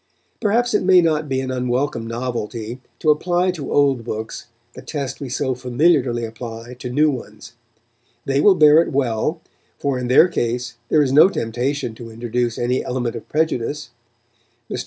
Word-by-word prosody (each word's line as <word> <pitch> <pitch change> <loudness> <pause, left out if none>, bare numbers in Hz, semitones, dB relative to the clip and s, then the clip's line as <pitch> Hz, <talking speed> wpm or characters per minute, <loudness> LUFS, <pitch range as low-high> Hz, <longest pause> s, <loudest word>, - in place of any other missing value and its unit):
Perhaps 240 +3 +1
it - - +3
may 185 0 +6
not 155 -3 +1
be 130 0 0
an 130 -1 -4
unwelcome 125 -1 -1
novelty 115 0 -4 0.2
to 155 - +3
apply 175 +4 +1
to 155 -6 -6
old 140 -4 +2
books 110 0 -6 0.3
the - - -10
test 140 -4 -5
we 135 - -5
so 130 +1 -1
familiarly 125 -1 +1
apply 115 +1 -8
to 125 - -5
new 150 +4 +3
ones. 110 -5 -9 0.7
They 135 +1 +1
will 200 +2 +6
bear 155 -1 +7
it - - -3
well, 135 +4 -1 0.4
for 140 -3 -1
in 125 - -3
their 130 +8 +6
case 120 -6 -2
there 155 -1 +4
is 130 - -1
no 150 +7 +7
temptation 120 - -2
to 115 +1 -10
introduce 120 +1 -2
any 125 +2 0
element 125 -2 -3
of 115 - -9
prejudice. 145 -4 -1 0.8
Mr. - - -3
130 Hz, 170 wpm, -20 LUFS, 120-150 Hz, 0.8 s, bear